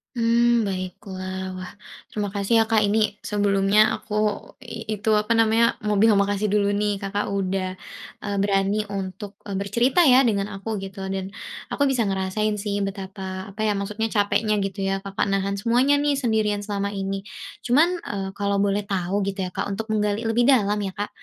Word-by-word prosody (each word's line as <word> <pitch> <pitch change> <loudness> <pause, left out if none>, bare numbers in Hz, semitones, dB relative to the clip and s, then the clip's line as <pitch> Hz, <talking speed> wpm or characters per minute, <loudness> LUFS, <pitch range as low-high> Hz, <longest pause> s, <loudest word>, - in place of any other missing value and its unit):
Mmm, 235 0 +3
baiklah. 185 0 -5
Wah 185 0 -7 0.4
terima 205 -1 -2
kasih 200 +2 -2
ya, - - +5
Kak, 220 -2 +4
ini 210 0 +1
sebelumnya 205 0 +3
aku 210 - -10 0.5
itu 220 -3 -4
apa 210 +2 +1
namanya, 225 0 +4
mau 210 -1 0
bilang 210 -1 +5
makasih 205 +1 0
dulu 205 -1 +3
nih 205 0 0
Kakak 205 +1 -2
udah, 190 -1 -1 0.5
eee, 205 -1 -3
berani 200 +1 +1
untuk, 195 +1 -5
eee, 200 -2 -5
bercerita 235 - +2
ya 260 -2 +7
dengan 210 -5 0
aku 210 +2 -4
gitu 195 0 -7
dan 190 0 -4 0.4
aku 285 -1 +2
bisa 250 -4 +1
ngerasain 195 +2 0
sih 200 -1 -2
betapa 190 -1 -6
apa 215 +2 -3
ya 210 - +2
maksudnya 205 +2 -2
capeknya 215 +1 +2
gitu 195 0 -3
ya, 195 0 -1
Kakak 195 0 -2
nahan 195 0 0
semuanya 245 +7 +3
nih 290 0 +2
sendirian 220 -6 0
selama 200 -1 -3
ini. 195 0 -3 0.4
Cuman, 320 +9 +4
eee, 195 -1 -3
kalau 200 0 +1
boleh 200 0 +1
tahu 195 0 -1
gitu 195 0 -3
ya, 185 - -2
Kak, - - -3
untuk 205 +3 -4
menggali 215 +1 0
lebih 235 +2 +3
dalam 210 -6 +4
ya, 195 -2 -3
Kak, 205 +2 -4
205 Hz, 175 wpm, -24 LUFS, 195-220 Hz, 0.5 s, ya